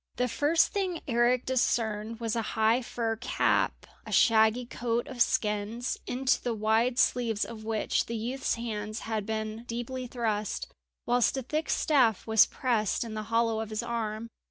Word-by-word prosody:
The 250 +1 +1
first 295 +7 +2
thing 375 -5 -2
Eric 240 0 +2
discerned 225 -3 0
was 230 -2 -2
a 230 - +1 0.2
high 220 +3 +3
fur 230 -2 -2
cap, 250 - 0 0.2
a - - -9
shaggy 225 +1 +4
coat 235 0 -2
of 255 -2 -5
skins, 210 +3 0
into 260 +1 +1
the 240 -2 -2
wide 220 +3 +1
sleeves 230 -5 +2
of 220 -2 -9
which 220 -1 0
the 230 - -4
youth's 245 +5 -2
hands 215 -2 -4
had 220 -2 -3
been 220 +1 -3
deeply 245 +2 -4
thrust, 220 -4 -2 0.4
whilst 245 +1 +2
a 265 - -2
thick 305 +5 -2
staff 250 -9 +2
was 220 -1 +5
pressed 230 -6 0
in 230 -2 -7
the 215 - -3
hollow 230 -1 +2
of 220 -1 -4
his 215 +1 -3
arm. 230 -1 -3
230 Hz, 165 wpm, -29 LUFS, 220-245 Hz, 0.4 s, was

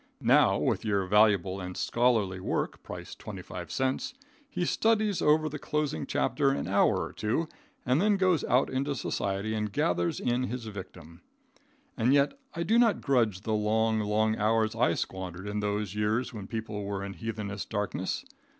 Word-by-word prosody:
Now, - - +5
with - - 0
your 100 -3 +1
valuable 100 -2 +3
and 90 0 -6
scholarly 110 -6 +1
work, - - -2
price - - -8
twenty - - -8
five - - -7
cents, 135 - -1 0.3
he 180 -10 -2
studies 215 -1 +2
over 155 +1 +4
the 150 0 -5
closing 150 -2 -2
chapter 140 - +1
an 135 - -1
hour 100 +2 +3
or - - -7
two, 115 +10 -1 0.4
then 190 +11 +3
goes 185 -5 +2
out 125 +2 +3
into 140 +2 -1
society 100 -2 -2
and 105 -1 -2
gathers 85 -2 0
in 125 +1 0
his 125 -1 -5
victim. 90 -5 -9 0.7
And 125 +3 +3
yet 140 0 +3 0.2
I 170 - -1
do 225 +6 +3
not 230 -3 +3
grudge 115 -9 +1
the 110 +1 -2
long, 110 +1 +2
long 110 +1 +1
hours 110 +1 +2
I 115 +2 +2
squandered 95 0 -5
in 105 +1 -2
those 105 -1 -2
years 110 +5 0
when 105 -4 -7
people 110 -2 -4
were 100 -1 -3
in 100 - -6
heathenish 105 -2 -5
darkness. 105 - -2
110 Hz, 170 wpm, -29 LUFS, 100-135 Hz, 0.7 s, Now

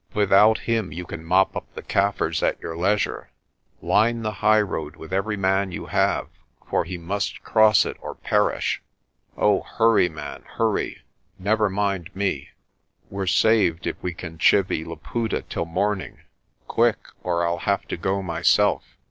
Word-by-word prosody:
Without 105 +1 +5
him 115 -4 -1
you 90 +1 -6
can 80 -1 -8
mop 95 +3 +2
up - - -6
the - - -7
Kaffirs 100 +1 0
at - - 0
your 80 - -6
leisure. 100 +5 0 0.5
Line 115 +2 +2
the 110 - -1
highroad 105 -8 +1
with 80 +3 -10
every 105 +2 0
man 95 0 +1
you - - -6
have, - - +1 0.4
for - - 0
he 90 +2 -5
must 95 +4 -3
cross 110 -3 +5
it - - -5
or - - -7
perish. - - 0 0.6
Oh, 105 -2 +3
hurry, 115 -5 +3
man, 75 -2 -8 0.2
hurry; 110 -2 -1 0.3
never 105 +2 +1
mind 95 -3 -1
me. 95 -8 -2 0.6
We're 95 -1 -3
saved 95 -4 +3
if - - -2
we 90 -2 -4
can 80 -2 -8
chivy 95 -4 +3
Laputa 95 +8 -3
till 85 - -4
morning. 95 +4 -2 0.5
Quick, - - +2 0.2
or 85 -1 0
I'll 85 0 -1
have 100 +2 -1
to - - -2
go 95 +3 -1
myself." 85 +3 +2
95 Hz, 155 wpm, -23 LUFS, 85-105 Hz, 0.6 s, Without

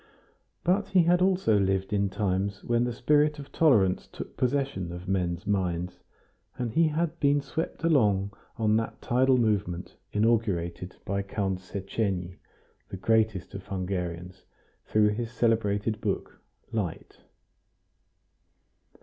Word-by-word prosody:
But 190 +4 +2
he 185 -3 +4
had 175 +2 +3
also 185 - +3
lived 95 +1 0
in 100 -1 +2
times 100 0 -1
when 120 0 +1
the 120 - -1
spirit 150 +5 +2
of 140 -1 -10
tolerance 105 - +3
took - - -8
possession 125 -9 -1
of 90 +2 -8
men's 90 -1 -1
minds, 90 -3 -1 0.6
and 120 -2 -2
he 165 +6 +4
had 155 +1 -1
been 145 0 +3
swept 160 +4 -4
along 105 -11 +3 0.2
on 110 -1 +3
that 115 - -3
tidal 130 +2 +3
movement 100 -7 -1
inaugurated 100 -6 0
by 100 0 -1
Count 95 -1 -2
Szechenyi, 95 -1 -3 0.5
the 95 - -6
greatest 110 -2 +1
of 95 -1 -8
Hungarians, 90 -1 -4 0.4
through 105 -1 +4
his 115 +2 -2
celebrated 110 -2 +1
book, 100 -3 -3 0.3
"Light." 100 -7 -4
105 Hz, 125 wpm, -28 LUFS, 95-125 Hz, 0.6 s, he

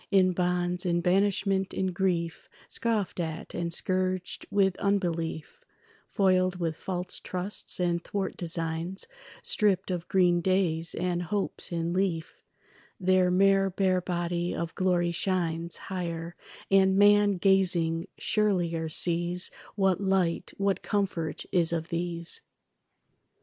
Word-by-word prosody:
In 190 -2 +4
bonds, 180 0 0
in 175 -1 +1
banishment, 195 +1 +1
in 190 -1 0
grief, 175 -3 -1 0.2
Scoffed 220 -6 -1
at 160 -1 -4
and 170 -1 -2
scourged 185 +1 -1
with 195 -2 +2
unbelief, 170 -6 -2 0.5
Foiled 185 -1 +2
with 165 -3 -2
false 180 +1 -4
trusts 185 +2 -3
and 170 -1 0
thwart 195 -2 -3
designs, 165 +2 -1 0.4
Stripped 195 -3 +2
of 175 -1 -3
green 175 -2 +3
days 170 -3 0
and 175 0 -1
hopes 195 +2 -3
in 170 0 -1
leaf, 180 -4 -2 0.6
Their 185 -1 +3
mere 195 +1 +4
bare 185 -1 +1
body 175 0 -2
of 165 -1 -3
glory 175 -2 +1
shines 170 -2 -1
Higher, 170 -2 -5 0.4
and 190 0 +5
man 205 0 +6
gazing 175 -3 +2
surelier 175 -6 0
sees 175 +2 0 0.2
What 195 -2 +2
light, 190 -3 0
what 195 -1 0
comfort 190 -6 -2
is 170 -2 +2
of 165 0 -2
these. 170 -1 -1
180 Hz, 120 wpm, -28 LUFS, 170-190 Hz, 0.6 s, man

